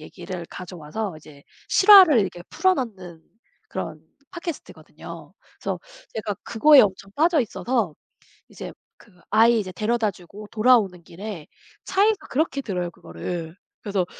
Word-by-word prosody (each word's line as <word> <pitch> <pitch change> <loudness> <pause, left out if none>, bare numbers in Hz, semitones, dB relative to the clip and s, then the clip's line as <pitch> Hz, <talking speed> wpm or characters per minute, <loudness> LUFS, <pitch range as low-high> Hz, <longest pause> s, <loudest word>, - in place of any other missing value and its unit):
얘기를 175 +1 -8
가져 180 0 -9
와서 175 +5 -5
이제 145 -2 -16 0.3
실화를 380 - +8
이렇게 180 -4 -2
풀어 375 0 +2
넣는 190 - -6 0.5
그런 160 -4 -5 0.3
팟캐스트거든요. 340 -2 -9 0.3
그래서 - - -3 0.4
제가 210 -2 -3
그거에 290 +5 +6
엄청 195 0 -1
빠져 325 0 +3
있어서 235 - -1 0.6
이제 - - -8 0.3
그 220 - -21 0.2
아이 230 +1 +5
이제 185 -3 -4
데려다 220 +2 0
주고 195 +4 -12
돌아오는 215 -6 +3
길에 185 -2 -8 0.4
차에서 415 +3 +3
그렇게 280 -1 0
들어요, 180 -7 -3
그거를. 160 - -7 0.3
그래서 200 -4 -1
205 Hz, 320 characters per minute, -23 LUFS, 175-250 Hz, 0.6 s, 실화를